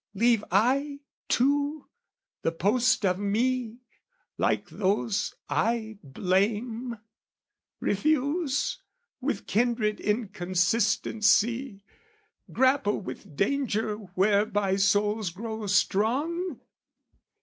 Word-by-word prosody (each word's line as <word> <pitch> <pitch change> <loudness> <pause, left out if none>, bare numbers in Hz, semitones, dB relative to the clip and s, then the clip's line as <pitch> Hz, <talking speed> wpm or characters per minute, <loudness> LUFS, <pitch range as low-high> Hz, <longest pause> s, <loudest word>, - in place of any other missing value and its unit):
leave 230 +1 +3
I, 275 +8 +1 0.3
too, 285 +3 +1 0.5
the 165 - 0
post 215 +7 +2
of 185 0 +1
me, 235 +3 -1 0.5
like - - 0
those 200 +1 -1
I 220 -2 -1
blame? 215 - -1 0.8
Refuse, 290 - 0 0.4
with 265 -6 -3
kindred 220 -1 +1
inconsistency, 210 +3 +1 0.7
Grapple 260 -5 +2
with 165 -6 -9
danger 220 - 0 0.2
whereby 200 0 +2
souls 205 +1 +2
grow 220 +4 -6
strong? 275 - 0
220 Hz, 75 wpm, -27 LUFS, 200-255 Hz, 0.8 s, leave